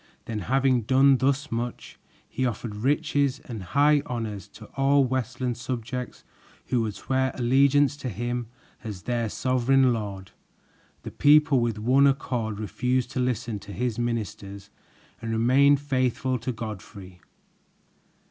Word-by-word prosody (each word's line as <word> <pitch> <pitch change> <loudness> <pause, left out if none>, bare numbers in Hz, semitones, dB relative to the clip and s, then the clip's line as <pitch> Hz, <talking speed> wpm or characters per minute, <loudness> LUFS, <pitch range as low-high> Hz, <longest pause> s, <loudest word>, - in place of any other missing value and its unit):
Then 110 -2 -4
having 130 +4 +2
done 130 +3 +4
thus 140 +2 0
much, 120 +1 -5 0.3
he 130 - -3
offered 115 -3 -3
riches 140 +2 +1
and 115 -7 -7
high 145 +10 +3
honors 110 -5 -4
to 110 +2 -13
all 140 0 +3
Westland 125 -1 -2
subjects 125 0 -5 0.5
who 125 -2 +2
would 110 -2 -3
swear 130 0 -1
allegiance 140 +3 +3
to 135 -3 -5
him 120 +3 -3 0.4
as 105 -4 -7
their 120 -2 -1
sovereign 130 +2 +2
lord. 100 -4 -5 0.7
The - - -7
people 150 -1 +5
with 120 -2 -1
one 130 +6 +4
accord 120 -6 -1
refused 125 +4 -1
to - - -3
listen 120 -3 -1
to 100 - -11
his 120 0 -2
ministers 100 -4 -4 0.5
and 115 0 -4
remained 135 +5 +4
faithful 130 -2 -1
to 125 +3 -3
Godfrey. 100 -5 -8
125 Hz, 135 wpm, -26 LUFS, 110-135 Hz, 0.7 s, people